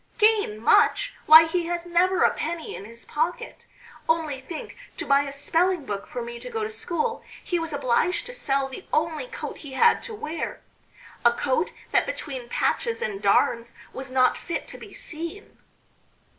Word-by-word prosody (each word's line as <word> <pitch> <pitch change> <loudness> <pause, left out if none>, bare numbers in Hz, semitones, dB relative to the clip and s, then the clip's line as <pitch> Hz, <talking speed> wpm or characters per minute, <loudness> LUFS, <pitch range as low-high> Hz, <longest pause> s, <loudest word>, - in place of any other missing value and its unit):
"Gain 425 - +3
much? - - +4
Why, 320 +1 +11
he 335 +1 -1
has 345 0 -2
never 355 +2 +3
a - - +5
penny 330 -1 -4
in 195 - -8
his 230 +2 -10
pocket. 320 +4 -3 0.4
Only 315 -5 +1
think, 310 +4 -7 0.2
to - - -4
buy 280 0 +4
a 275 - -5
spelling 330 +3 +1
book 200 -3 -4
for 245 - -5
me 235 0 -7
to - - -8
go 450 -2 -2
to 435 - -3
school, 455 +3 -2 0.2
he 350 -2 -1
was 330 0 -3
obliged 285 +5 +1
to - - -6
sell 275 - 0
the 265 - -10
only 320 +7 0
coat - - -7
he 285 -3 -9
had 465 - +4
to 455 - -6
wear 320 -5 -4 0.6
a 235 - +7
coat 270 +7 0 0.2
that - - +3
between 270 - -5
patches 465 -1 0
and 200 -2 -3
darns 230 +3 +2 0.2
was 265 0 -6
not 255 -1 +3
fit 340 - -4
to - - -8
be - - -11
seen." 335 -3 -7
320 Hz, 180 wpm, -25 LUFS, 260-365 Hz, 0.6 s, Why